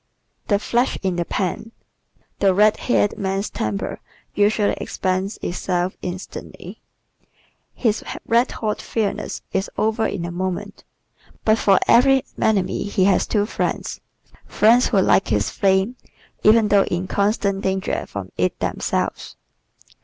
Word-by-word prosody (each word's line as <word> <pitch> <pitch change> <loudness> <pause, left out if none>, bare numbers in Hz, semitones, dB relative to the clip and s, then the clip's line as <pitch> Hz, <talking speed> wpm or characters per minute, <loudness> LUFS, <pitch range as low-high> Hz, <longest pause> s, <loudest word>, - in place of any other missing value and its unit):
The 205 - +3
"Flash 240 +5 0
in 185 -2 0
the 175 - -1
Pan" 200 +6 -3 0.4
¶ - - -39 0.2
The 195 -2 +3
red 210 +2 +4
haired 205 -4 +1
man's 195 +1 -2
temper 105 -2 -3 0.3
usually 205 0 +2
expends 190 +2 -2
itself 180 +1 -1
instantly. 180 +1 -8 0.9
His 225 -3 0 0.2
red 235 +2 +3
hot 215 -2 -3
fieriness 215 -3 -3
is 190 +2 -1
over 220 0 +1
in 175 -4 -4
a 175 - -5
moment. 185 +1 -4 0.6
But 220 0 +4
for 195 -2 +4
every 265 +2 +5 0.2
enemy 195 -4 +1
he 200 -2 0
has 195 0 +3
two 205 -2 +1
friends - - -3 0.5
friends 235 +4 +4
who 205 - +2
like 190 0 +3
his 105 -1 0
flame, 195 +5 +1 0.4
even 215 0 +5
though 200 -1 +4
in 175 +1 -2
constant 200 0 0
danger 190 -1 -2
from 100 -2 -7
it 90 0 0
themselves. - - -2
200 Hz, 135 wpm, -21 LUFS, 185-215 Hz, 0.9 s, every